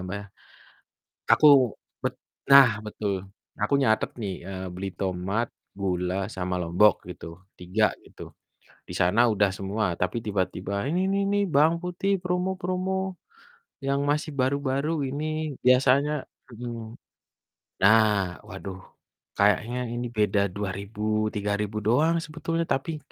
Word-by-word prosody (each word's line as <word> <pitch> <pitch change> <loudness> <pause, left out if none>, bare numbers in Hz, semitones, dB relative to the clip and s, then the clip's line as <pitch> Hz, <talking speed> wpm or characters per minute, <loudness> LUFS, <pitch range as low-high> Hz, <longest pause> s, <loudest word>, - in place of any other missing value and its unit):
Mbak, 95 +3 -4
ya. 100 - -12 1.1
Aku 150 - +6 0.5
bet - - -2 0.3
nah 140 -3 +9 0.2
betul. 105 -1 -3 0.5
Aku 105 - +1
nyatet 110 -5 +2
nih, 100 -3 -2 0.2
eee, 95 -1 -5
beli 95 +2 -4
tomat, 95 +5 -1 0.3
gula, 95 0 -1
sama 90 -1 -2
lombok 90 +5 +4
gitu, 90 - -8 0.3
3 95 +5 +1 0.2
gitu, - - -16 0.7
di - - -7
sana 90 +6 +3
udah 100 -1 +2
semua, 100 +3 -2 0.2
tapi 95 +6 0
tiba-tiba, 95 -2 -2
"Ini 180 +5 +1
nih 200 0 +1
nih 205 0 +2
bawang 155 +4 +5
putih 180 +3 0
promo 180 +1 -1
promo 190 +1 -2 0.7
yang 140 +1 +1
masih 150 +2 0
baru-baru 140 +3 0
ini 155 +1 -3
biasanya" 130 +3 +4 0.4
mhm. 115 -1 -7 0.9
Nah 105 -4 +4
waduh 95 -1 -7 0.6
kayaknya 105 +5 +2
ini 120 +1 -3
beda 105 -1 +3
Rp2.000, 105 +2 -2
Rp3.000 105 +1 -2
doang 155 +9 +3
sebetulnya, 165 +2 -2
tapi 145 +4 -1
110 Hz, 120 wpm, -26 LUFS, 100-150 Hz, 1.1 s, nah